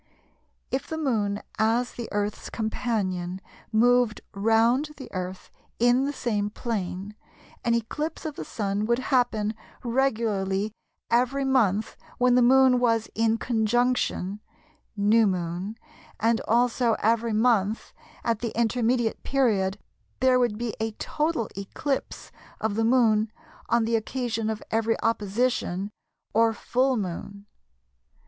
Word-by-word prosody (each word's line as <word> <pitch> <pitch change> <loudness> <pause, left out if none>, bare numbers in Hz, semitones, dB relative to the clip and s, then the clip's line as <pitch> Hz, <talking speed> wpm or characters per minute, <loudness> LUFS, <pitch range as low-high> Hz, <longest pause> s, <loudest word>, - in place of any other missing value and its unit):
If 265 - -2
the 320 - -4
Moon 215 -9 0 0.2
as 230 +3 +2
the 235 -2 -6
Earth's 205 0 -2
companion 195 -5 -2 0.3
moved 240 0 +3
round 225 +7 +3
the 265 - -10
Earth 185 0 -5 0.3
in 245 +3 +4
the 285 - -1
same 210 -7 -1
plane, 205 -3 -4 0.5
an 235 0 +2
eclipse 295 +10 -3
of 305 -2 -4
the - - -5
Sun 205 0 -2
would 235 0 +3 0.2
happen 220 -4 +2 0.3
regularly 220 -5 0 0.4
every 255 +3 +2
month 220 -6 +1 0.2
when 250 0 +4
the 250 - +5
Moon 260 0 +6
was 230 -2 +1
in 225 0 +2
"Conjunction" 230 -4 0 0.6
("New 210 +2 +4
Moon"), 180 +2 -2 0.4
and 225 +1 +2
also 240 0 +3
every 230 +1 +1
month 215 -2 +1 0.3
at 230 -3 0
the 235 -1 -3
intermediate 235 0 +1
period 210 -8 +1 0.4
there 255 0 +4
would 240 -4 +1
be 235 -1 -3
a 220 0 -2
total 300 0 -1
eclipse 230 +8 -4 0.3
of 220 -1 -1
the 225 +2 0
Moon 225 -3 +3 0.4
on 235 -1 +3
the 230 +1 +1
occasion 225 -1 -2
of 220 -1 -4
every 225 0 +1
"Opposition" 210 -3 0 0.4
(or 225 +1 +4
"Full 255 +3 +1
Moon"). 200 +1 -5
225 Hz, 125 wpm, -26 LUFS, 210-245 Hz, 0.6 s, Moon